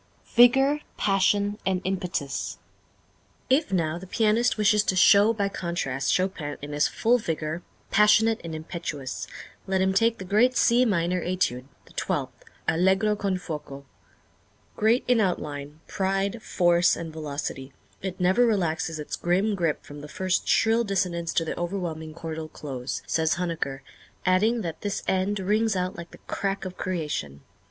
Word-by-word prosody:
Vigor, 270 +5 +5 0.2
Passion, 200 +1 +2
and 190 -1 +1
Impetus. 180 -8 -3 0.9
If 290 0 +3
now 170 -3 0
the 190 - -10
pianist 225 +4 +2
wishes 210 0 +4
to 190 - +1
show 200 +4 +6
by 205 -3 0
contrast 170 -9 -2
Chopin 180 -6 -1
in 145 +1 -7
his 150 0 +2
full 245 +2 +2
vigor, 160 -3 -3 0.3
passionate 215 +2 +4
and 165 -1 -5
impetuous, 155 -5 -5 0.4
let 190 0 +1
him 190 0 +2
take 225 +4 +3
the 190 - -7
great 225 +7 +3
C 245 +2 +4
Minor 180 -4 +1
Étude, 175 -9 -1 0.2
the - - -19
twelfth, - - -2 0.3
Allegro 190 +5 +3
con 195 -2 -1
fuoco. 150 -5 -7 0.9
"Great 225 +4 +3
in 245 -3 +4
outline, 150 -5 -3
pride, 195 +3 -1
force 175 -2 +3
and 165 -1 -6
velocity, 140 -3 -5 0.3
it 190 -1 -5
never 185 +7 +4
relaxes 165 -6 0
its 150 - -4
grim 190 +5 +1
grip 170 -6 -1
from 145 0 -10
the 150 - -8
first 185 +4 -1
shrill 225 +1 +3
dissonance 180 -5 -1
to 165 - 0
the - - -3
overwhelming 170 -3 -4
chordal 160 -1 -6
close," 130 -3 -5
says 160 -1 +1
Huneker, 165 -6 -3 0.4
adding 215 +6 +3
that 165 -5 -5
"this 205 -1 -3
end 190 +2 +1
rings 215 +3 +1
out 185 0 -1
like 170 0 -8
the - - -14
crack 195 0 -2
of 185 -1 -6
creation." 150 - -3
185 Hz, 150 wpm, -26 LUFS, 160-205 Hz, 0.9 s, show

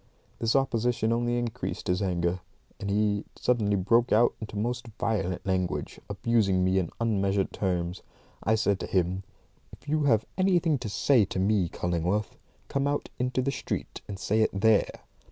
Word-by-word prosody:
This 115 +2 +1
opposition 120 -3 +1
only 120 +1 0
increased 120 0 -3
his 90 +1 +1
anger, 90 -1 0 0.4
and 100 - -4
he 105 0 +1
suddenly 105 -5 +1
broke 115 +6 +2
out 115 +3 +5
into 105 -1 -6
most 120 +3 -2
violent 95 -4 -1
language, 90 -6 -1
abusing 100 -6 +2
me 95 +1 +3
in 90 - -2
unmeasured 100 -4 +1
terms. 90 -2 -2 0.4
I 110 - +2
said 100 -3 +1
to - - -4
him, 95 0 0 0.5
"If - - -15
you 150 0 +1
have 110 -5 +3
anything 175 -6 +3
to 120 -4 -4
say 120 +3 +4
to 95 - -5
me, 95 -2 +2
Cullingworth, 90 +6 -1 0.3
come 140 0 0
out 145 0 -1
into 125 +1 0
the 140 - 0
street - - -4
and 100 - -6
say 110 +3 +1
it 110 - +4
there. 110 0 +3
105 Hz, 165 wpm, -28 LUFS, 95-120 Hz, 0.5 s, out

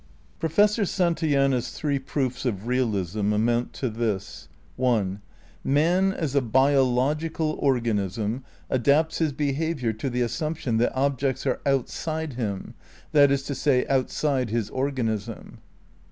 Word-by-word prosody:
Professor 205 +7 +3
Santayana's 155 - +1
three 145 -2 -1
proofs 130 -2 -2
of 110 -5 -2
realism 105 -5 0
amount 120 +3 +1
to 130 - -2
this: 110 -4 -3 0.3
(1) 105 -6 0 0.4
Man 175 +7 +3
as 155 -7 -3
a 140 - +3
biological 135 +5 +2
organism 115 -3 0 0.2
adapts 145 +5 +2
his 160 -3 +2
behaviour 145 -3 -1
to 110 +5 -3
the 125 0 -1
assumption 140 -2 -1
that 120 +3 +1
objects 135 -1 0
are - - 0
outside 155 +3 -1
him, 105 -6 -4 0.4
that 145 -2 +6
is 140 0 +1
to 140 - -4
say, 135 -1 +2
outside 135 -1 0
his 110 -1 -2
organism. 115 -5 -3
130 Hz, 125 wpm, -25 LUFS, 115-145 Hz, 0.4 s, that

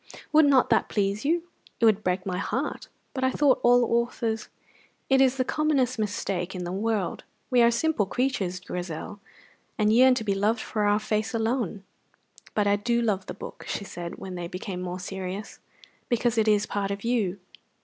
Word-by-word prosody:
"Would 310 0 +7
not 270 -3 +4
that - - +3
please 200 +2 -1
you?" 335 +3 +2 0.4
"It 230 - +4
would 215 -1 +4
break 185 0 0
my 180 -2 -2
heart." 260 +8 -3 0.3
"But 260 - -3
I 260 - +4
thought 275 0 +3
all 245 0 +5 0.2
authors 225 -2 -3 0.3
" - - -34
"It 265 0 +6
is 265 0 +3
the 255 - +1
commonest 270 -5 +1
mistake 195 -3 -2
in 180 - -4
the 175 - -4
world. 205 -1 -1 0.3
We 250 -1 +5
are 235 - +6
simple 235 -3 +1
creatures, 205 -8 -1
Grizel, 180 +1 -6 0.6
and 215 0 +3
yearn 255 +2 +6
to 230 - -2
be 200 -2 +1
loved 210 +4 +1
for 215 -1 -2
our 205 0 +4
face 215 +2 -1
alone." 225 -3 -1 0.7
"But 210 - +2
I 200 0 +3
do 235 +3 0
love 205 -5 0
the - - -6
book," - - -9
she - - -3
said, 175 -3 -7
when 190 - -8
they 175 -1 -4
became 180 +1 -5
more 180 0 -4
serious, 190 +2 -6 0.5
"because 240 -1 +1
it 220 -1 +2
is 210 -1 +3
part 200 -1 -2
of 200 0 -4
you." 215 -6 0
215 Hz, 190 wpm, -26 LUFS, 195-245 Hz, 0.7 s, Would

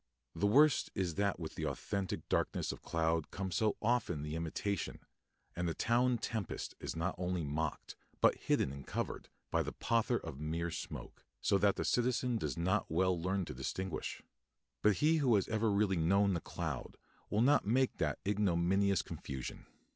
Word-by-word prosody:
The 100 +5 +1
worst 145 +6 +5
is 90 -3 0
that 100 0 0
with 80 -2 -5
the - - -3
authentic 100 -2 -3
darkness - - 0
of - - -8
cloud 80 -1 0
comes 95 -2 -4
so 110 -2 +2
often 105 -10 +1
the 75 +1 -4
imitation, 85 +4 -2 0.5
and 85 0 -1
a 80 - -3
town 120 +1 +2
tempest 110 -4 -3
is - - -4
not 85 +3 -1
only 90 -1 -1
mocked, 75 +1 -3 0.2
but - - +6
hidden 65 - +1
and 70 -1 -9
covered, - - -3 0.2
by - - +3
the - - -3
pother 115 +1 +1
of 80 -9 -7
mere 85 +3 -2
smoke, 75 - -7 0.2
so 100 - +2
that 100 +1 +4
the - - -2
citizen 125 0 +1
does 75 -8 -2
not 90 +3 +1
well 90 +1 +2
learn 95 +1 0
to - - -6
distinguish. 85 +7 -4 0.6
But 105 - +5
he 160 +2 +5
who 130 -7 +4
has 100 - +2
ever 110 0 +1
really 100 -2 +2
known 100 +4 +3
the 85 - -1
cloud - - -5 0.3
will 105 - +2
not 135 -3 +4
make 130 +4 +2
that - - 0
ignominious 100 -1 +2
confusion. 65 -2 -6
95 Hz, 175 wpm, -35 LUFS, 80-110 Hz, 0.6 s, but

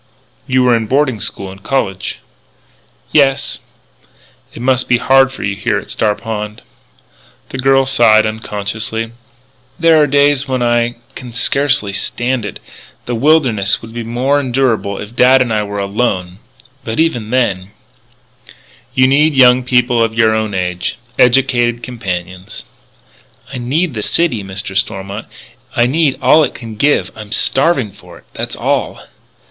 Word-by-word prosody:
"You 130 0 +2
were 125 -1 +4
in 110 -1 -2
boarding 130 -3 +1
school 95 -1 -3
and 95 0 -13
college." 95 -7 -2 0.9
"Yes." 140 -1 +2 0.9
"It - - -11
must 130 +1 +1
be 120 - +4
hard 135 +2 +4
for 135 - -8
you 100 -1 -2
here 100 - -1
at - - -7
Star 105 -2 0
Pond." 105 -1 -6 0.9
The 130 - -6
girl 135 +1 +3
sighed, 115 -5 +4
unconsciously: 110 +1 -4 0.7
"There 165 -2 +4
are 150 - +3
days 145 0 +2
when 130 -2 -1
I 120 0 +1 0.2
can 125 -2 -9
scarcely 135 -3 +1
stand 120 +3 -2
it.... - - -8 0.5
The 120 - -3
wilderness 120 -7 +2
would 115 0 -10
be 120 - -4
more 125 +5 0
endurable 125 -6 0
if 105 +3 -9
dad 130 +2 +5
and 120 -3 0
I 105 - +1
were 100 -1 -4
all 100 0 -3
alone.... 95 -4 -2 0.4
But 110 +3 -4
even 125 -10 0
then 100 -7 0 0.6
" 120 +1 -25
"You 130 -1 +5
need 145 +3 +3
young 125 -1 +6
people 125 -1 +2
of 115 0 -2
your 110 -1 +3
own 110 -2 -2
age, 90 +1 -2 0.2
educated 120 -2 +3
companions 95 -6 -6 0.4
" - - -22
"I 130 - -4
need 145 +7 -1
the 110 - -4
city, 120 -3 +1
Mr. 95 +1 -6
Stormont. 95 +2 -3 0.5
I 120 - +3
need 145 +2 +1
all 155 - +5
it - - -2
can 115 -2 -8
give: 105 -6 +1
I'm 105 -1 -10
starving 135 - +1
for 90 -3 -15
it. - - -19
That's - - -4
all." - - -2
120 Hz, 155 wpm, -15 LUFS, 105-135 Hz, 0.9 s, young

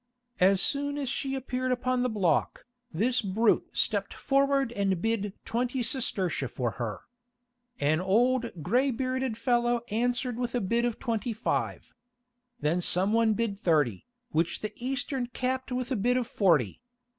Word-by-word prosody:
As 190 +1 +5
soon 285 0 0
as 275 -3 -2
she 270 0 -2
appeared 255 -1 -2
upon 255 0 0
the 250 - +1
block, 190 -8 0 0.3
this 235 +9 +1
brute 210 +2 +2
stepped - - 0
forward 275 -2 +2
and 195 -5 0
bid 210 -1 -1
twenty 245 +2 -1
sestertia 190 - 0
for 120 -3 -2
her. 110 -4 -3 0.8
An 150 +2 +2
old 230 -1 +1
grey 250 - +2
bearded 255 -1 -2
fellow 240 -1 +1
answered 245 +2 0
with 245 0 -2
a - - +2
bid 235 +4 +1
of 240 -2 -1
twenty 230 +1 -2
five. 220 - -2 0.7
Then 165 +4 +1
some 185 +4 +2
one 225 -1 +4
bid 215 -3 -2
thirty, 150 - +1 0.2
which 165 -1 0
the 215 0 -4
Eastern 265 0 -2
capped 260 +1 -2
with 250 +1 -2
a - - +2
bid 245 +4 +2
of 250 - 0
forty. 165 - +2
235 Hz, 155 wpm, -28 LUFS, 195-255 Hz, 0.8 s, As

